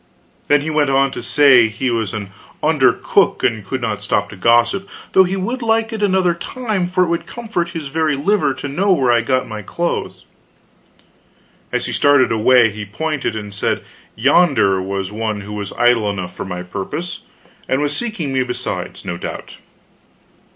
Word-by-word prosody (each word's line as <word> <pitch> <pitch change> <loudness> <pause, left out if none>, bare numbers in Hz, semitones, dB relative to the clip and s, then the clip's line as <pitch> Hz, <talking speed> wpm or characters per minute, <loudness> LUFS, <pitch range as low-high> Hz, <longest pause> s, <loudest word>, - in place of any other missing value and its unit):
Then 145 0 +4
he 160 +2 -3
went 150 -2 +2
on 135 0 +3
to - - -6
say 135 -6 +5
he 115 +4 -2
was 110 -5 -1
an 100 -3 -6 0.3
under - - +4
cook - - +1
and 110 -2 +1
could 130 +7 -4
not 105 -2 -2
stop 105 0 0
to - - -9
gossip, 120 - +2 0.2
though 190 - +6
he 185 +2 -2
would 235 +7 -3
like 225 0 +1
it 220 - -4
another 190 -3 +2
time; 210 +1 -3
for 185 0 +2
it - - 0
would 170 0 -2
comfort 215 -8 -3
his 150 -4 -6
very 155 0 0
liver 145 -1 +1
to - - -6
know 185 +8 +1
where 130 -8 +2
I 120 -1 +4
got 130 +2 0
my 110 -1 -6
clothes. 170 - -3 1.5
As - - -1
he - - -4
started 145 -2 +4
away 115 +1 +4
he 105 +1 -7
pointed 135 +3 -3
and 105 -2 -6
said 100 - -1 0.3
yonder 125 - +3
was 95 0 -3
one 105 -1 -3
who 105 +1 -8
was 100 -2 -5
idle 120 -3 +3
enough 90 -3 -5
for - - -5
my 90 -1 -5
purpose, 100 - -5 0.5
and 130 - +2
was 145 -1 0
seeking 205 - -3
me 130 - +2
besides, 125 -1 -4
no 85 - -4
doubt. - - -7
130 Hz, 185 wpm, -18 LUFS, 105-170 Hz, 1.5 s, though